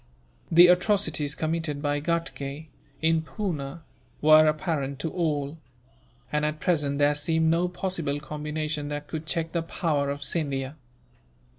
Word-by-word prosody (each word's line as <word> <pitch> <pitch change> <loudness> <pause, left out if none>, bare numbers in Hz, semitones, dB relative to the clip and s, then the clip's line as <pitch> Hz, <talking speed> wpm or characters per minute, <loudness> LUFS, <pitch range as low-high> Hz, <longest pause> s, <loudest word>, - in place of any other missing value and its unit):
The 170 +2 +9
atrocities 175 -5 +2
committed 160 -2 -2
by 145 0 0
Ghatgay, 155 -2 -3 0.3
in 160 0 +3
Poona, 160 -4 -4 0.4
were 155 +1 +7
apparent 150 -3 -1
to 160 - -2
all; 155 -3 -1 0.7
and 150 0 0
at 150 0 -1
present 150 -5 +1
there 145 0 +4
seemed 160 +2 +2
no 170 +2 +2
possible 175 -5 -2
combination 150 0 -4
that 145 0 -4
could 160 0 -6
check 165 0 -1
the 170 - 0
power 155 -4 -1
of 140 0 -4
Scindia. 140 -2 -1
155 Hz, 135 wpm, -26 LUFS, 145-165 Hz, 0.7 s, The